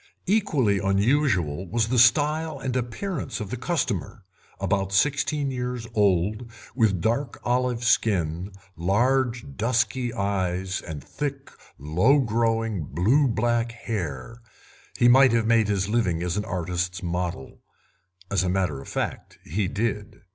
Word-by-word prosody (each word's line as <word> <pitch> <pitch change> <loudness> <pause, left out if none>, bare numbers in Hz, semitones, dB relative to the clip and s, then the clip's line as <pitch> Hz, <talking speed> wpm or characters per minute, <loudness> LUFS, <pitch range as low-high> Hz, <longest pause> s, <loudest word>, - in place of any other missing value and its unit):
Equally 150 - +2
unusual 95 - +1
was 115 -1 0
the 125 0 +2
style 150 +5 +3
and 130 -2 -4
appearance 130 - -3
of 105 -3 -6
the - - -2
customer; 130 - -2 0.4
about 95 -1 0
sixteen 145 +5 +1
years 125 -2 -4
old, 105 +3 +1 0.2
with 110 -7 +2
dark 120 +4 -1
olive 125 -1 0
skin, 95 -6 +1 0.2
large 120 +7 +1
dusky 120 +2 0
eyes, 95 -2 -2
and 75 -4 -7
thick, 140 -1 -5 0.3
low 90 - +3
growing, 115 - 0
blue 110 - +2
black 120 0 0
hair, 105 - -5 0.6
he 120 - +4
might 130 +1 +6
have 115 -1 +2
made 115 -1 +3
his 100 -2 0
living 95 -7 0
as 90 0 -2
an 105 -1 -2
artist's 90 +1 -3
model. 90 -5 -4 0.7
As 95 -3 +2
a 90 - 0
matter 90 -7 -1
of - - -12
fact - - -4
he 95 +5 -1
did. 105 0 -3
110 Hz, 135 wpm, -25 LUFS, 95-125 Hz, 0.7 s, might